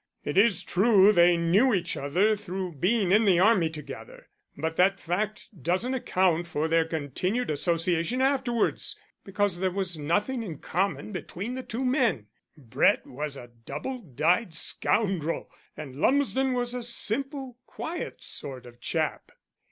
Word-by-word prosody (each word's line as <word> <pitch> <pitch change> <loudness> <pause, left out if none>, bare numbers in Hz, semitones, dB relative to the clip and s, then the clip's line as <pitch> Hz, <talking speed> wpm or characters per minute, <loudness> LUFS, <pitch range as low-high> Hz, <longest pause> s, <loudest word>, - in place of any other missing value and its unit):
It 145 - -3
is 200 -2 +4
true 205 +1 +5
they 175 -2 +5
knew 195 +9 +3
each 175 -2 -2
other 180 +10 +1
through 190 -3 -5
being 190 - +1
in 215 +3 +5
the 190 -5 +4
army 185 -3 +4
together, - - -10 0.3
but 160 0 -2
that 195 +2 +3
fact 210 +6 -3
doesn't 185 - 0
account 180 -8 +1
for 155 -1 -1
their 165 0 +2
continued 165 - -2
association 170 - 0
afterwards, 260 -3 0 0.2
because 195 -2 -1
there 190 0 +1
was 180 -3 -2
nothing 205 - 0
in 175 -9 -6
common 195 +7 -2
between 195 +4 -5
the 260 - -4
two 255 +1 -4
men: 245 - +1 0.3
Brett 125 -7 +2
was 145 +1 -5
a 120 -2 -11
double 265 -1 -5
dyed 170 - 0
scoundrel, 180 -3 +1 0.3
and 140 -4 -8
Lumsden 265 - +2
was 245 -1 -1
a 250 - -3
simple, 255 +2 -2
quiet 340 +2 -6
sort 130 -3 -7
of 120 0 -14
chap. - - -2
190 Hz, 145 wpm, -27 LUFS, 165-235 Hz, 0.3 s, true